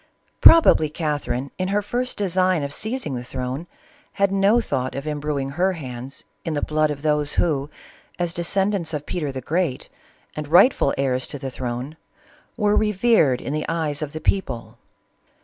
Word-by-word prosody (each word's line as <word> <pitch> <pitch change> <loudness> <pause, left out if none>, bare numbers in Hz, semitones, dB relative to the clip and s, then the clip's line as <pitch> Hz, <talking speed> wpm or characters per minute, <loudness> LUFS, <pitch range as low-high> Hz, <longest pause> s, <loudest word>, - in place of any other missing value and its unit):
Probably 320 - +7
Cath 150 -2 -2
erine, 125 +3 -2
in 185 - 0
her 205 +2 0
first 250 +4 -2
design 185 -4 +1
of 140 0 -4
seizing 220 - -3
the 125 -1 -4
crown, 130 +6 -5 0.5
had 200 -1 +1
no 195 +4 +4
thought 130 - -2
of 140 +1 -5
imbruing 145 -2 -2
her 185 +6 +1
hands 130 -4 -7 0.2
in 160 -2 -2
the 145 - -1
blood 155 0 +1
of 145 0 -5
those 150 -1 +1
who, 145 -4 0 0.5
as 175 -1 -1
descendants 180 -1 0
of 145 0 -5
Peter 150 -5 -3
the 130 -1 -6
Great 160 -1 -2 0.5
and 150 -1 -5
rightful 175 - +5
heirs 130 -2 0
to - - -6
the 135 -1 -5
throne, 125 +5 -5 0.6
were 210 -2 +2
revered 210 - +3
in 140 - -4
the 155 0 -2
eyes 160 -3 -1
of 150 -2 -3
the 155 - -6
people. 115 - -2
155 Hz, 170 wpm, -22 LUFS, 135-185 Hz, 0.6 s, Probably